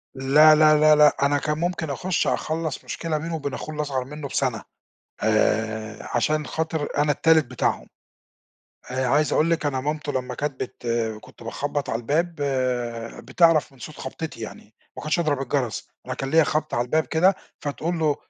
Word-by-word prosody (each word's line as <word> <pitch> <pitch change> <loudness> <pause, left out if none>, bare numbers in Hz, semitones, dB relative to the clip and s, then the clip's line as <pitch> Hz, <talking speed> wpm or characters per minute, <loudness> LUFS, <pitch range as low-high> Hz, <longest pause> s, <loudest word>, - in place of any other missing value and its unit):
لا، 150 +4 +6
لا، 155 0 +6
لا، 155 0 +6
لأ، 150 0 +6
أنا 145 +1 +2
كان 150 +1 -1
ممكن 170 -2 -2
أخُش 180 +5 -1
أخلّص 160 -2 -2
مشكلة 165 -2 -3
بينه 165 +2 -4
وبين 140 -3 -4
أخوه 155 - -6
الأصغر 140 -4 -2
منّه 145 +1 -7
بسَنة 130 -5 -1 0.6
آآ 110 0 +1 0.2
عشان 150 +5 +1
خاطر 160 -2 -2
أنا 145 0 +3
التالت 160 0 +4
بتاعهم. 125 - -1 1.0
آآ 130 0 0
عايز 145 +3 +2
أقول 160 +2 +3
لِك 165 -2 0
أنا 135 -2 0
مامته 150 +1 -2
لمّا 130 -2 -3
كانت 145 -2 -3
بت 120 -1 -10 0.3
كنت - - -15
باخبّط 145 +4 -3
على 115 - -1
الباب، 165 +7 0 0.9
بتعرف 165 -5 +3
من 135 - -20
صوت 150 +6 -9
خبطتي 135 -1 -6
يعني، 110 0 -9 0.2
ما - - -6
كنتش 155 +3 0
أضرب 150 -4 0
الجَرس. 130 -3 -2 0.2
أنا - - -3
كان 135 0 -4
ليّا 160 0 +6
خبطة 155 +1 -1
على 120 - +1
الباب 155 +5 +1
كده، 185 +4 +3 0.2
فتقول 160 +4 -3
له: 155 -2 +2
150 Hz, 175 wpm, -24 LUFS, 130-155 Hz, 1.0 s, لا